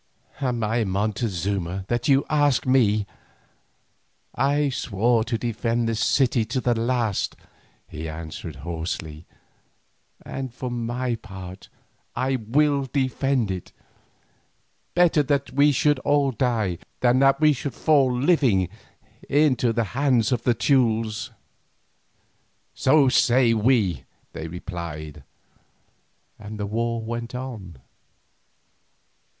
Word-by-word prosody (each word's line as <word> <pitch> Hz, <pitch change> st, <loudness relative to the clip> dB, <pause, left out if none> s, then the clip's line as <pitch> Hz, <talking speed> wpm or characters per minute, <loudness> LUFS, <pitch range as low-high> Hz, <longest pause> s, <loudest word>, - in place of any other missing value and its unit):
"Am 125 Hz, -4 st, -1 dB
I 110 Hz, +2 st, +1 dB
Montezuma, 95 Hz, -2 st, -2 dB
that 120 Hz, 0 st, -1 dB
you 140 Hz, -1 st, +4 dB
ask 145 Hz, -3 st, +2 dB
me? 110 Hz, -6 st, +3 dB, 1.3 s
I 145 Hz, +1 st, +1 dB
swore 115 Hz, -1 st, +1 dB
to 115 Hz, -1 st, -1 dB
defend 115 Hz, 0 st, -1 dB
this 115 Hz, -1 st, -1 dB
city 120 Hz, 0 st, +2 dB
to 120 Hz, +4 st, -2 dB
the 125 Hz, -1 st, +1 dB
last," 115 Hz, -3 st, -1 dB, 0.5 s
he 80 Hz, +1 st, -6 dB
answered 80 Hz, 0 st, -7 dB
hoarsely, 80 Hz, -2 st, -5 dB, 1.0 s
"and, 130 Hz, -2 st, -5 dB
for 125 Hz, +1 st, -5 dB
my 120 Hz, +1 st, -2 dB
part, 95 Hz, -4 st, -9 dB, 0.5 s
I 130 Hz, 0 st, 0 dB
will 140 Hz, +5 st, +1 dB
defend 135 Hz, -4 st, 0 dB
it. 90 Hz, -2 st, -6 dB, 1.2 s
Better 175 Hz, -3 st, +4 dB
that 140 Hz, 0 st, -1 dB
we 145 Hz, +2 st, +4 dB
should 145 Hz, +1 st, +2 dB
all 140 Hz, 0 st, +2 dB
die, 110 Hz, -7 st, -1 dB, 0.2 s
than 125 Hz, +1 st, +4 dB
that 135 Hz, +1 st, +4 dB
we 155 Hz, -1 st, +5 dB
should 135 Hz, -1 st, -5 dB
fall 140 Hz, -5 st, +3 dB
living 125 Hz, -, +2 dB, 0.6 s
into 135 Hz, -5 st, +3 dB
the 115 Hz, 0 st, 0 dB
hands 130 Hz, -3 st, +2 dB
of 125 Hz, -3 st, +1 dB
the 120 Hz, 0 st, +1 dB
Teules." 115 Hz, -3 st, +1 dB, 1.4 s
"So 140 Hz, 0 st, +4 dB
say 125 Hz, -1 st, +4 dB
we," 110 Hz, -4 st, +1 dB, 0.3 s
they 80 Hz, -, -6 dB
replied, 80 Hz, -4 st, -7 dB, 1.2 s
and 105 Hz, 0 st, -8 dB
the 105 Hz, -, -2 dB
war 115 Hz, +3 st, -1 dB
went 115 Hz, +2 st, -5 dB
on. 110 Hz, -, -7 dB
120 Hz, 110 wpm, -24 LUFS, 105-135 Hz, 1.4 s, we